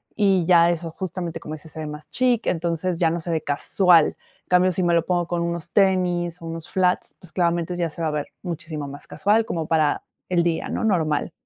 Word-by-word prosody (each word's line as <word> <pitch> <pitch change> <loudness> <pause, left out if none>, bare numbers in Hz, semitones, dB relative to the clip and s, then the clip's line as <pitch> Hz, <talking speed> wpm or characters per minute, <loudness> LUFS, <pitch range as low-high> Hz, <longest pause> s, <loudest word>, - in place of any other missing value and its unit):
y 195 -5 +3
ya 170 -1 +6
eso, 165 -1 -4
justamente, 175 -2 -5
como 155 - -6
dices, 155 +1 -13
se 160 - -8
ve 155 - -4
más 150 0 -8
chic, 250 -3 +1
entonces, 170 +1 -1
ya 165 -2 +3
no 170 - -2
se 170 +1 -3
ve 160 -2 0
casual. 165 +3 +4
En - - -13
cambio, 180 +1 +4
si 185 - -1
me 170 0 +2
lo 170 -1 +2
pongo 175 -2 0
con 175 -1 -1
unos 170 -2 -3
tenis, 180 -3 +1
o - - -8
unos 165 -1 -6
flats, 185 -1 +1
pues, 175 -3 -13
claramente, 170 -1 0
ya 170 -2 -1
se 165 - -8
va 160 - +1
a - - 0
ver 150 -1 -3 0.2
muchísimo 160 -4 -5
más 140 +1 -10
casual, 215 +2 +2
como 165 -2 -3
para 155 -2 +2 0.3
el 175 -2 +3
día, 170 -1 -1
¿no? - - -2
Normal. 160 -6 +1
170 Hz, 230 wpm, -23 LUFS, 160-180 Hz, 0.3 s, ya